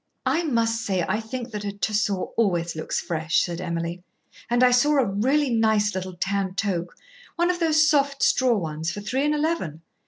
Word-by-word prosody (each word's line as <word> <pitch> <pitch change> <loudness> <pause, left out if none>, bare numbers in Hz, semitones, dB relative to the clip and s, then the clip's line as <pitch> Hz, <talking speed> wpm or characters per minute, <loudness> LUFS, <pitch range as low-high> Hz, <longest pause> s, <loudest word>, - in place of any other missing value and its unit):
"I 335 - +2
must 230 -4 0
say 190 -5 0
I 210 +3 0
think 235 +2 -6
that 210 -1 -5
a 200 - -2
Tussore 205 -1 -1
always 175 -7 0
looks 155 - -2
fresh," 160 -1 0
said 175 0 -3
Emily, 170 0 -3 0.5
"and 240 +1 +3
I 250 - +6
saw 290 +4 +4
a 265 - +4
really 255 +8 +1
nice 220 -2 +2
little 185 -1 -5
tan 190 +1 -2
toque 180 -4 -2 0.4
one 345 +1 +2
of 350 - -4
those 310 -2 +4
soft 280 -2 +2
straw 250 -3 +3
ones 160 -2 -3
for 205 - -6
three 255 +7 -1
and 300 0 +2
eleven. 295 - -2
210 Hz, 190 wpm, -24 LUFS, 180-260 Hz, 0.5 s, I